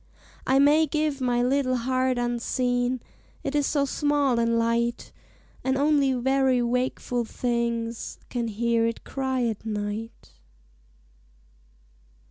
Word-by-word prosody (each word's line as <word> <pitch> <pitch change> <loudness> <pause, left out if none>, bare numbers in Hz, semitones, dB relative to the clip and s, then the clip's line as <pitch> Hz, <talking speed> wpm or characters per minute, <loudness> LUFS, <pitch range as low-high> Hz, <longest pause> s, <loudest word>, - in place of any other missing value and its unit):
I 265 - +4
may 295 +3 +5
give 300 -1 -1
my 245 -1 +1
little 255 0 +1
heart 255 +1 0
unseen, 245 +1 0 0.4
It 275 - -3
is 290 -1 +2
so 285 -2 +1
small 285 -3 +1
and 230 0 +2
light, 235 +1 0 0.5
And 265 0 +1
only 285 -2 +3
very 265 0 +2
wakeful 250 0 -1
things 235 -1 -2
Can 240 -2 -2
hear 230 +1 +1
it 230 - -4
cry 265 -2 -2
at 225 -3 -3
night. 210 - -5
250 Hz, 115 wpm, -26 LUFS, 235-270 Hz, 0.5 s, may